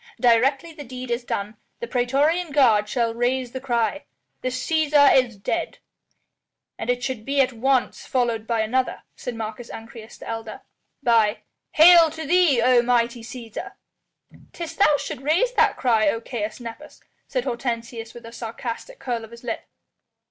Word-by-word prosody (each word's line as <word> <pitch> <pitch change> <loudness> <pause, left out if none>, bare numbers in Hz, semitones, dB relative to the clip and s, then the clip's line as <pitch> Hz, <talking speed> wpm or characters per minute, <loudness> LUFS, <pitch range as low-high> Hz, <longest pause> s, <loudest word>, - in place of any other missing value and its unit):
"Directly 270 +6 +3
the 300 -2 -9
deed 255 -1 -7
is 235 +1 -1
done, 210 -2 -4 0.2
the 475 - -4
praetorian 290 - +1
guard 225 -7 +4
shall 230 0 0
raise 245 +1 -1
the 260 - -6
cry: 245 +2 -1 0.4
'The - - -3
Cæsar 290 +2 +3
is 245 -5 +2
dead!'" 335 +12 -3 1.0
"And - - -4
it 245 0 0
should 255 -2 -4
at 270 -2 +2
once 260 +2 0
be - - -20
followed 235 -4 0
by 230 -2 +1
another," 255 +4 -1
said 245 - -6
Marcus 225 +1 -6
Ancyrus, 225 0 -10
the - - -11
elder, 225 -1 -6 0.4
"by 225 -3 +3 0.3
'Hail 335 +1 +8
to 320 0 -6
thee, 320 -7 +4
O 250 -1 +5
mighty 240 0 +1
Cæsar!'" 240 - -8 0.8
"'Tis 330 -2 -6
thou 305 -6 +4
shouldst 270 - -6
raise 350 - +2
that - - +3
cry, 225 -5 +3
O 225 - -1
Caius 225 -2 -5
Nepos," 240 +6 -10 0.3
said 255 -3 -2
Hortensius 235 -2 -4
with 240 -1 -11
a 230 - -9
sarcastic 235 - -6
curl 240 - -3
of 225 - -10
his 235 +1 -13
lip. 235 -2 -4
245 Hz, 160 wpm, -23 LUFS, 230-275 Hz, 1.0 s, Hail